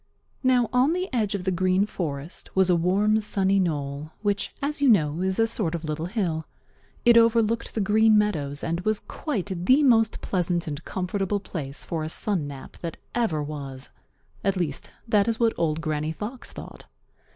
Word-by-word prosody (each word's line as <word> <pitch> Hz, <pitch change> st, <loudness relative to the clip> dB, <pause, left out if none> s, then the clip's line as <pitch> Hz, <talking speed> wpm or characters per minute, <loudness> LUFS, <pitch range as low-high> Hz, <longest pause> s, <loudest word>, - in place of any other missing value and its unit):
Now 255 Hz, -3 st, +3 dB
on 255 Hz, +6 st, +4 dB
the 365 Hz, +1 st, -1 dB
edge 215 Hz, -4 st, +1 dB
of 190 Hz, -, -4 dB
the 190 Hz, -, 0 dB
Green 185 Hz, +2 st, +2 dB
Forest 155 Hz, -6 st, -6 dB
was 190 Hz, -1 st, +4 dB
a -, -, +5 dB
warm, 200 Hz, +6 st, +2 dB
sunny 195 Hz, -1 st, +2 dB
knoll, 150 Hz, -3 st, -2 dB
which, 205 Hz, -1 st, 0 dB
as 290 Hz, +1 st, -2 dB
you 280 Hz, -, +5 dB
know, 160 Hz, -6 st, +3 dB
is 190 Hz, 0 st, 0 dB
a 225 Hz, -, +4 dB
sort 210 Hz, -7 st, 0 dB
of 170 Hz, -, -5 dB
little 155 Hz, +2 st, -3 dB
hill. 175 Hz, -6 st, -2 dB, 0.6 s
It 235 Hz, -1 st, +7 dB
overlooked 230 Hz, 0 st, +3 dB
the 220 Hz, -, +1 dB
Green 215 Hz, +2 st, +4 dB
Meadows 150 Hz, -10 st, 0 dB
and 170 Hz, +1 st, -1 dB
was 215 Hz, +2 st, 0 dB
quite 205 Hz, -, -4 dB
the 265 Hz, +8 st, +5 dB
most 225 Hz, -4 st, +4 dB
pleasant 175 Hz, -2 st, -1 dB
and 150 Hz, 0 st, -5 dB
comfortable 195 Hz, +2 st, -1 dB
place 145 Hz, -8 st, -5 dB
for 160 Hz, -2 st, -3 dB
a 155 Hz, -, -3 dB
sun 175 Hz, -3 st, 0 dB
nap 140 Hz, -2 st, -10 dB
that 170 Hz, -2 st, -5 dB, 0.2 s
ever 200 Hz, -11 st, 0 dB
was. 140 Hz, -3 st, -6 dB, 0.5 s
At 195 Hz, -1 st, +1 dB
least, 160 Hz, -6 st, -2 dB, 0.2 s
that 210 Hz, -2 st, +3 dB
is 230 Hz, -1 st, 0 dB
what 230 Hz, -1 st, +3 dB
Old 160 Hz, -1 st, 0 dB
Granny 155 Hz, -1 st, -2 dB
Fox 225 Hz, +9 st, -5 dB
thought. -, -, -10 dB
190 Hz, 185 wpm, -25 LUFS, 160-220 Hz, 0.6 s, It